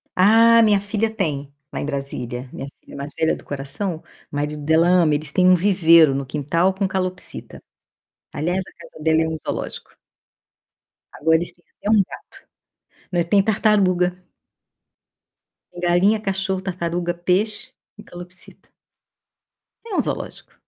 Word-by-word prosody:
Ah, 230 Hz, +4 st, +6 dB
minha 205 Hz, -2 st, +4 dB
filha 210 Hz, +2 st, -1 dB
tem, 150 Hz, -10 st, -3 dB, 0.2 s
lá -, -, -3 dB
em -, -, -3 dB
Brasília, 130 Hz, -3 st, -4 dB
minha 135 Hz, -, -6 dB
filha -, -, -14 dB
mais 140 Hz, +1 st, -6 dB
velha 160 Hz, -, +2 dB
do -, -, -14 dB
coração, 145 Hz, +5 st, -5 dB, 0.3 s
marido 150 Hz, +1 st, -3 dB
dela 160 Hz, +3 st, +3 dB
ama, 170 Hz, -4 st, +4 dB
eles 145 Hz, 0 st, +1 dB
têm 185 Hz, 0 st, +4 dB
um 185 Hz, -, +7 dB
viveiro 170 Hz, -5 st, +5 dB
no 140 Hz, 0 st, -2 dB
quintal 155 Hz, +7 st, 0 dB
com 195 Hz, 0 st, -1 dB
calopsita. 185 Hz, -1 st, -4 dB, 0.7 s
Aliás, 175 Hz, +5 st, -1 dB
a 190 Hz, -, -7 dB, 0.2 s
casa 155 Hz, -, -13 dB
dela 160 Hz, 0 st, +3 dB
é -, -, -1 dB
um 160 Hz, -, -3 dB
zoológico. -, -, -6 dB, 1.2 s
Agora 160 Hz, +1 st, +4 dB
eles 175 Hz, -, -3 dB
têm 175 Hz, -, -30 dB
até 205 Hz, -, -3 dB
um 215 Hz, -2 st, +5 dB
gato. -, -, -11 dB, 0.9 s
Não, 175 Hz, -, +2 dB
e -, -, +1 dB
tem 195 Hz, +3 st, +3 dB
tartaruga. 185 Hz, -4 st, +2 dB, 1.5 s
Tem 175 Hz, -, -11 dB
galinha, 180 Hz, +5 st, +3 dB
cachorro, 190 Hz, -1 st, -2 dB
tartaruga, 175 Hz, -2 st, -2 dB
peixe 185 Hz, +5 st, -1 dB, 0.3 s
e 210 Hz, -, -11 dB
calopsita. 175 Hz, +1 st, -13 dB, 1.2 s
É 420 Hz, -5 st, -5 dB
um -, -, +2 dB
zoológico. -, -, -4 dB
175 Hz, 150 wpm, -21 LUFS, 155-195 Hz, 1.5 s, um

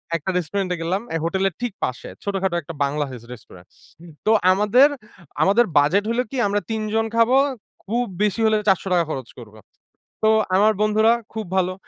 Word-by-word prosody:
একটা 165 Hz, +2 st, -3 dB
রেস্টুরেন্টে 180 Hz, +2 st, -2 dB
গেলাম 185 Hz, +5 st, -1 dB
এই 165 Hz, -, 0 dB
হোটেলের 190 Hz, +1 st, 0 dB
ঠিক 245 Hz, -5 st, -3 dB
পাশে 125 Hz, -, -4 dB
ছোটখাটো 195 Hz, -3 st, -1 dB
একটা 165 Hz, +2 st, -9 dB
বাংলা 145 Hz, +1 st, -1 dB, 0.3 s
রেস্টুরেন্ট। 90 Hz, -6 st, -15 dB, 0.6 s
তো 215 Hz, -, +3 dB, 0.2 s
আমাদের, 210 Hz, +9 st, +4 dB, 0.5 s
আমাদের 210 Hz, +5 st, +4 dB
বাজেট 160 Hz, +8 st, +3 dB
হল 235 Hz, -, -1 dB
কি 265 Hz, -, -4 dB
আমরা 205 Hz, +1 st, 0 dB
৩ 220 Hz, -, -2 dB
জন 225 Hz, 0 st, +1 dB
খাবো, 230 Hz, +3 st, +4 dB, 0.5 s
খুব 235 Hz, +4 st, -1 dB, 0.2 s
বেশি 210 Hz, +1 st, 0 dB
হলে 220 Hz, 0 st, +3 dB
৳৪০০ 185 Hz, -3 st, +2 dB
খরচ 130 Hz, -4 st, -5 dB
করব। 110 Hz, -3 st, -13 dB, 0.7 s
তো 220 Hz, -, +5 dB, 0.3 s
আমার 210 Hz, +3 st, +4 dB
বন্ধুরা 215 Hz, +1 st, +3 dB, 0.2 s
খুব 220 Hz, -1 st, -4 dB
ভালো। 185 Hz, 0 st, +1 dB
195 Hz, 160 wpm, -22 LUFS, 170-220 Hz, 0.7 s, তো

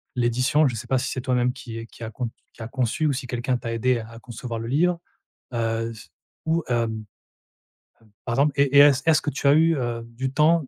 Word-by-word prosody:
l'édition, 125 Hz, +5 st, +2 dB
je 120 Hz, -, -2 dB
sais 110 Hz, -, -6 dB
pas 130 Hz, -, +2 dB
si 130 Hz, +1 st, -1 dB
c'est 130 Hz, -, -3 dB
toi-même 125 Hz, -1 st, +1 dB
qui 115 Hz, -4 st, -8 dB
qui 115 Hz, -, -12 dB
a 110 Hz, -, -4 dB
con 120 Hz, +1 st, -3 dB, 0.2 s
qui -, -, -14 dB
a -, -, -5 dB
conçu 130 Hz, +4 st, -1 dB
ou 140 Hz, -, +2 dB
si 130 Hz, -1 st, -5 dB
quelqu'un 120 Hz, +1 st, -1 dB
t'a 115 Hz, -1 st, -5 dB
aidé 120 Hz, +1 st, +1 dB
à 110 Hz, 0 st, -9 dB
à 115 Hz, 0 st, -11 dB
concevoir 120 Hz, -1 st, -6 dB
le 115 Hz, -, -5 dB
livre? 170 Hz, +6 st, +2 dB, 0.6 s
Heu, 115 Hz, 0 st, -1 dB
c 105 Hz, -, -13 dB, 0.4 s
ou 165 Hz, +1 st, +1 dB
hem 115 Hz, -2 st, +1 dB, 1.2 s
hem, 105 Hz, -, -25 dB
par 115 Hz, -1 st, -1 dB
exemple 145 Hz, +1 st, +3 dB
et 140 Hz, 0 st, +3 dB
est-ce 145 Hz, -2 st, +7 dB
est-ce 160 Hz, -2 st, +4 dB
que 145 Hz, -, -2 dB
tu 140 Hz, -, -1 dB
as 140 Hz, -, +7 dB
eu, 160 Hz, 0 st, +4 dB
hem, 120 Hz, -2 st, -2 dB
du 130 Hz, +1 st, -2 dB
temps 155 Hz, 0 st, +3 dB
125 Hz, 230 wpm, -24 LUFS, 115-140 Hz, 1.2 s, est-ce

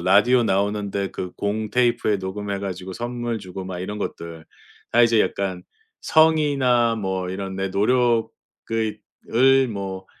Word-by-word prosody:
라디오 105 Hz, +7 st, +4 dB
나오는데 100 Hz, -1 st, -1 dB
그 90 Hz, -1 st, -6 dB
공테이프에 110 Hz, +1 st, 0 dB
녹음해 100 Hz, +1 st, -4 dB
가지고 95 Hz, -1 st, -5 dB
선물 120 Hz, +1 st, -3 dB
주고 95 Hz, -1 st, -8 dB
막 90 Hz, -1 st, -6 dB
이런 105 Hz, +3 st, -5 dB
것들. 85 Hz, -5 st, -6 dB, 0.5 s
다 120 Hz, -, +5 dB
이제 115 Hz, -2 st, +4 dB
약간 95 Hz, -4 st, -2 dB, 0.4 s
'성의나 140 Hz, -7 st, +3 dB
뭐 95 Hz, -4 st, -3 dB
이런 95 Hz, 0 st, -5 dB
내 95 Hz, 0 st, -1 dB
노력을 115 Hz, +4 st, +2 dB, 0.4 s
을 120 Hz, +4 st, +1 dB
뭐 95 Hz, -3 st, -5 dB
105 Hz, 265 characters per minute, -23 LUFS, 95-120 Hz, 0.5 s, 다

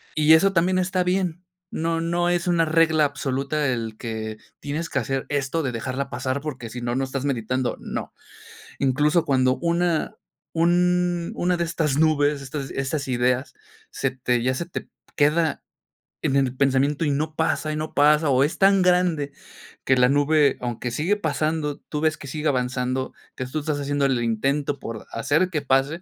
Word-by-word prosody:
Y 155 Hz, +1 st, +5 dB
eso 195 Hz, +5 st, +5 dB
también 185 Hz, +2 st, +2 dB
está 185 Hz, 0 st, 0 dB
bien. 180 Hz, -1 st, -1 dB, 0.3 s
No 165 Hz, 0 st, -1 dB
no 175 Hz, +1 st, 0 dB
es 175 Hz, 0 st, 0 dB
una 170 Hz, -2 st, +3 dB
regla 160 Hz, -1 st, +3 dB
absoluta 140 Hz, +1 st, -1 dB
el 115 Hz, -3 st, -2 dB
que 110 Hz, -2 st, -5 dB, 0.2 s
tienes 155 Hz, +3 st, -4 dB
que -, -, 0 dB
hacer 135 Hz, -1 st, -2 dB
esto 145 Hz, +3 st, -1 dB
de 130 Hz, -, -1 dB
dejarla 130 Hz, +4 st, -3 dB
pasar, 130 Hz, +1 st, -2 dB
porque 130 Hz, -6 st, -6 dB
sí 120 Hz, +2 st, -7 dB
no, 120 Hz, 0 st, -2 dB
no 135 Hz, -, 0 dB
estás 135 Hz, +1 st, -4 dB
meditando, 125 Hz, -1 st, -1 dB
¿no? -, -, -5 dB, 0.7 s
Incluso 150 Hz, +5 st, +2 dB
cuando 130 Hz, -1 st, +2 dB
una 170 Hz, -1 st, 0 dB, 0.4 s
un 175 Hz, +1 st, +2 dB
una 180 Hz, 0 st, +1 dB
de 170 Hz, -, 0 dB
estas 155 Hz, -4 st, -1 dB
nubes, 145 Hz, -2 st, +2 dB
estas 135 Hz, 0 st, -5 dB
estas 140 Hz, +1 st, -2 dB
ideas, 125 Hz, +1 st, 0 dB, 0.4 s
se 135 Hz, -1 st, -1 dB
te 125 Hz, -2 st, 0 dB
ya 130 Hz, +1 st, +1 dB
se 170 Hz, -, -3 dB
te -, -, -7 dB, 0.3 s
queda 155 Hz, +2 st, +2 dB, 0.6 s
en 135 Hz, -, 0 dB
el 130 Hz, -2 st, +1 dB
pensamiento 140 Hz, +3 st, +2 dB
y 145 Hz, -, +1 dB
no 155 Hz, +2 st, -2 dB
pasa 155 Hz, -1 st, 0 dB
y -, -, -3 dB
no 155 Hz, 0 st, -4 dB
pasa, 150 Hz, +1 st, +4 dB
o 130 Hz, 0 st, +4 dB
es 150 Hz, -, -1 dB
tan 195 Hz, 0 st, +5 dB
grande 180 Hz, -6 st, +2 dB, 0.5 s
que 130 Hz, -1 st, +3 dB
la 125 Hz, -, +5 dB
nube, 145 Hz, +1 st, +3 dB
aunque 120 Hz, 0 st, -3 dB
sigue 180 Hz, -, 0 dB
pasando, 155 Hz, -3 st, -1 dB
tú 150 Hz, -, -2 dB
ves 155 Hz, 0 st, +1 dB
que 140 Hz, -, -10 dB
sigue 150 Hz, +3 st, -3 dB
avanzando, 130 Hz, 0 st, -1 dB, 0.2 s
que 130 Hz, -, -4 dB
tú 130 Hz, +5 st, -3 dB
estás 150 Hz, -1 st, -2 dB
haciendo 145 Hz, 0 st, 0 dB
el 125 Hz, -3 st, +1 dB
intento 140 Hz, +6 st, 0 dB
por 115 Hz, -2 st, -7 dB
hacer 155 Hz, +10 st, +1 dB
que 150 Hz, -4 st, -1 dB
pase, 135 Hz, +5 st, +1 dB
145 Hz, 180 wpm, -23 LUFS, 130-165 Hz, 0.7 s, Y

